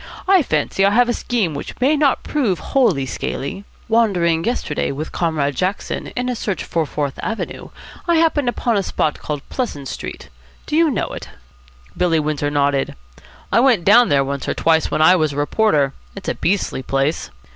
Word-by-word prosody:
"I 380 -1 +6
fancy 155 - 0
I 200 - +6
have 240 +4 +3
a - - +2
scheme 220 -12 -1
which 140 - -7
may 270 +5 +3
not 290 -3 +2
prove 240 - 0
wholly 195 - +1
scaly. 140 +8 -4 0.2
Wandering 180 -8 +2
yesterday 220 - -1
with 150 +3 -5
Comrade 150 -5 -1
Jackson 185 +7 -2
in 250 0 -2
a 250 - -1
search 205 -4 -3
for 165 -3 -1
Fourth 145 -2 -3
Avenue, 225 0 -4 0.4
I 340 - +3
happened 315 -5 +2
upon 240 -2 0
a - - +2
spot 155 -5 -1
called 150 -2 -5
Pleasant 145 - -3
Street. - - -7 0.4
Do 300 - -3
you 330 0 +4
know 245 - -1
it?" - - -8 0.7
Billy 170 -3 +2
Windsor 150 -1 -1
nodded. 140 -1 0 0.6
"I - - +4
went 240 -8 +3
down 235 +4 +6
there 140 -1 +3
once 140 0 -4
or - - -1
twice 160 -1 +2
when 155 - +1
I 180 +3 +7
was 155 -4 +1
a - - -7
reporter. 145 -3 +2 0.2
It's 195 - -5
a - - 0
beastly 190 -7 -1
place." 135 - -1
180 Hz, 185 wpm, -19 LUFS, 145-240 Hz, 0.7 s, I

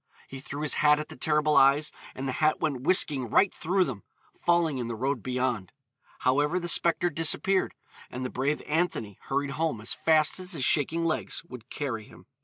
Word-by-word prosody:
He 135 - -9
threw 145 +1 -6
his 150 - +2
hat 150 0 +5
at 150 - -6
the - - -10
terrible 150 +2 +1
eyes, 140 +2 +4 0.2
and 135 +1 -4
the - - -1
hat 155 0 +3
went 140 -5 -2
whisking 140 -6 +3
right 195 - +3
through 185 +3 +1
them, 125 - -5 0.3
falling 170 -5 +1
in 120 - -3
the 115 - -4
road 130 +2 -2
beyond. 125 -6 -2 0.5
However, 145 +7 +2
the 175 - -5
spectre 170 +1 +2
disappeared, 165 +5 +1 0.3
and 130 +1 -5
the 125 - -4
brave 140 +4 -1
Anthony 150 - -2
hurried 140 +1 -1
home 155 -5 -2
as 110 - -3
fast 155 +1 +2
as 185 0 -6
his 140 -6 -1
shaking 165 +3 +2
legs 165 0 -2
would 125 -5 -12
carry 115 -7 -4
him. 85 -2 -17
145 Hz, 195 wpm, -27 LUFS, 130-160 Hz, 0.5 s, hat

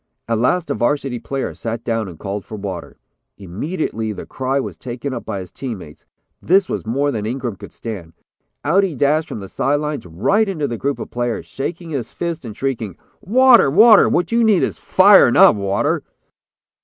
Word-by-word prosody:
At 115 -1 0
last, 170 +8 +1
a - - +2
Varsity 135 -1 -1
player 135 +4 -4
sat 115 0 -5
down 115 -3 -1
and 85 -3 -10
called 100 +2 -5
for 110 - -9
water. 95 -3 -6 0.4
Immediately, 110 - -4
the - - -8
cry 135 +1 -2
was - - -5
taken 130 +2 -6
up 120 - -6
by 100 - -4
his 90 -2 -11
team 125 -5 -5
mates. 75 -5 -13 0.4
This 190 +2 +3
was - - -4
more 140 +5 0
than 105 -3 -3
Ingram 120 -2 -3
could 100 +2 -12
stand. 95 -8 -8 0.5
Out 185 +7 +3
he 180 -6 -2
dashed 150 +5 +1
from 105 - -6
the 95 - -8
side 140 +8 0
lines, 150 -8 -4
right 195 - +1
into 155 -7 -2
the 120 - -4
group 140 0 -1
of - - -8
players, 120 -1 -2
shaking 165 +4 -6
his 130 -6 -4
fist 170 -3 -4
and 110 -4 -8
shrieking: 115 -8 -3 0.2
"'Water! 245 - +5
Water! 215 - +7
What 175 0 0
you 235 0 +3
need 215 -5 +4
is - - -2
fire, 190 -6 +6
not - - +7
water!'" 100 -1 0
130 Hz, 195 wpm, -19 LUFS, 110-165 Hz, 0.5 s, Water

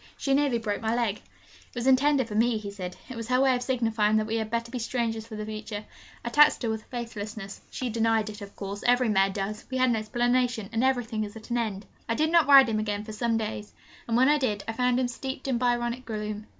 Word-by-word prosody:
'She 275 - 0
nearly 280 -3 +2
broke 210 -3 -3
my 225 +1 0
leg.' 230 -4 0
'It - - -25
was 240 0 -3
intended 265 0 +4
for 210 - -7
me,' 230 +2 +2
he 205 -1 -6
said. 185 -3 -6
'It 255 - -8
was 230 -1 -5
her 250 +1 +2
way 265 -1 +4
of 245 - -3
signifying 225 -4 +1
that 215 - +1
we 220 +1 -1
had 220 -1 -2
better 235 +1 -2
be 250 - -3
strangers 225 -2 -2
for 220 - -8
the 215 0 -5
future. 215 -1 -6 0.4
I - - -1
taxed 295 +2 +5
her 230 - 0
with 220 0 -3
her - - -25
faithlessness; 215 -4 -6
she 250 -2 -4
denied 225 -1 +1
it, 210 - -11
of 200 0 -10
course 200 +1 -6
every 245 -1 +4
mare 195 -2 +3
does; 200 +2 -4
we 260 - -2
had 255 -1 +3
an - - +2
explanation, 240 0 0
and 225 +2 +1
everything 245 -4 0
is 205 +1 -7
at 225 +2 -11
an 240 - +1
end!' 210 -3 -3 0.2
I 230 - +1
did 310 +4 +1
not 335 -3 +5
ride 275 -2 +9
him 220 -1 0
again 210 -1 -2
for 215 0 -8
some 230 +1 0
days, 215 -1 -5 0.3
and 230 0 +1
when 260 +2 +5
I 295 +1 +4
did, 210 -7 -1
I 225 - -2
found 250 +1 +1
him 255 - +1
steeped 265 +2 -6
in 250 -3 0
Byronic 240 0 0
gloom. 215 -2 -5
230 Hz, 255 wpm, -27 LUFS, 215-250 Hz, 0.4 s, ride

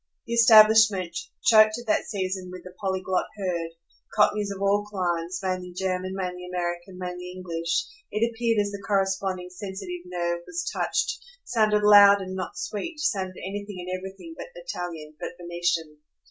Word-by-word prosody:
The 235 - -4
establishment, 220 -5 +6 0.3
choked 215 -7 +6
at 240 - -8
that 215 - +1
season 185 -2 -3
with 180 -1 -9
the 185 - -11
polyglot 190 -1 -1
herd, 175 -4 -2 0.5
cockneys 210 -1 +3
of 200 -1 -5
all 200 +1 +2
climes, 180 -3 -2
mainly 185 -1 -3
German, 185 0 -2
mainly 180 -1 -4
American, 175 +1 -3
mainly 180 0 -5
English, 170 -2 -2 0.2
it 225 +2 +1
appeared 230 -1 0
as 205 0 0
the 200 0 -7
corresponding 190 -2 -1
sensitive 190 -2 -6
nerve 175 -1 -2
was 345 +1 -4
touched, 470 0 0 0.2
sounded 215 -2 +2
loud 205 -1 +8
and 190 -1 -5
not 185 -1 -5
sweet, 300 - -4
sounded 190 -11 -1
anything 205 0 -6
and 180 +1 -4
everything 190 - -8
but - - -8
Italian, 175 - -6
but - - -5
Venetian. 170 -3 -2
190 Hz, 155 wpm, -26 LUFS, 180-210 Hz, 0.5 s, loud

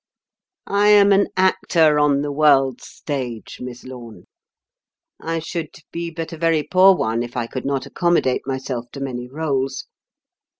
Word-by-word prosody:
I 200 +1 +2
am 205 -1 +6
an 200 0 +4
Actor 165 -5 +3
on 145 -1 +2
the 145 - -3
World's 140 -3 +2
Stage, 125 -6 -6
Miss 125 -1 -8
Lorne; 120 -7 -11 0.9
I 165 0 -3
should 165 -1 -5 0.2
be 170 0 -4
but 165 0 -6
a - - -7
very 165 -2 +2
poor 190 +3 +5
one 115 -6 -1
if 120 +1 -6
I 120 - -1
could 130 +2 -6
not 135 -2 -1
accommodate 170 -8 0
myself 130 -3 -4
to 140 - -7
many 125 -3 -5
rôles." 135 -2 -2
145 Hz, 155 wpm, -21 LUFS, 130-165 Hz, 0.9 s, am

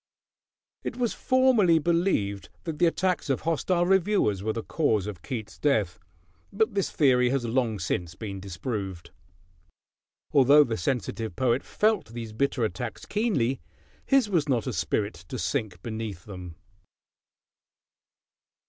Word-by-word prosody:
It - - -4
was 245 -2 0
formerly 255 -10 +4
believed 160 - 0
that 160 -3 -5
the 175 - +5
attacks 180 -2 0
of 135 - +1
hostile 170 +2 +1
reviewers 190 - +2
were 110 +2 -1
the 115 0 -4
cause 110 - +1
of 105 -4 -6
Keats' 110 -6 -6
death; 105 -9 +1 0.5
but 220 +1 +1
this 195 -2 0
theory 125 -4 +3
has 130 -2 0
long 115 -2 0
since 85 -2 -3
been 100 0 -6
disproved. 95 -1 -5 1.2
Although 140 +2 +7
the 115 -5 -2
sensitive 115 - -2
poet 130 0 +2
felt 215 -1 +1
these 115 -1 -7
bitter 125 0 +1
attacks 115 0 -5
keenly, 175 - 0 0.4
his 270 -5 +3
was 165 -7 0
not 120 -5 +1
a - - -2
spirit 85 +5 -1
to - - -5
sink 95 -6 -2
beneath 110 -6 -5
them. 90 -4 -8
125 Hz, 135 wpm, -27 LUFS, 105-170 Hz, 1.2 s, Although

